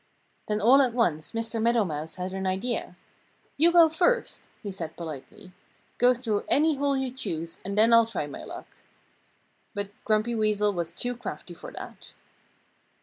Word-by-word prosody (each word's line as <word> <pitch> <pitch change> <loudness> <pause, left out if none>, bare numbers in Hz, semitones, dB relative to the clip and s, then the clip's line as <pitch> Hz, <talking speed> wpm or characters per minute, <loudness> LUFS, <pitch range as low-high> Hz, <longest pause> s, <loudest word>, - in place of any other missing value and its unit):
Then 210 0 0
all 250 +6 +6
at 250 -4 +1
once 155 -11 +1
Mr. 225 0 -2
Meadow 230 -1 +3
Mouse 155 -1 -5
had 185 0 -4
an 190 0 -2
idea. 190 +1 -2 0.6
"You 330 +4 +5
go 340 -1 +7
first!" 360 +10 +1 0.2
he 200 - -4
said 170 -4 -7
politely. 170 +4 -9 0.5
"Go 250 +1 +5
through 225 -4 -1
any 305 0 +3
hole 280 0 +1
you 265 -1 -2
choose 170 -10 -5
and 200 +1 -4
then 225 +2 +6
I'll 230 -1 +7
try 225 -9 -3
my 145 - -8
luck." - - -8 1.1
But 200 0 -3
Grumpy 215 +2 +1
Weasel 210 -2 +1
was 170 -3 -3
too 245 0 -3
crafty 245 - -7
to - - -10
do - - -9
that. - - -10
220 Hz, 170 wpm, -27 LUFS, 190-250 Hz, 1.1 s, go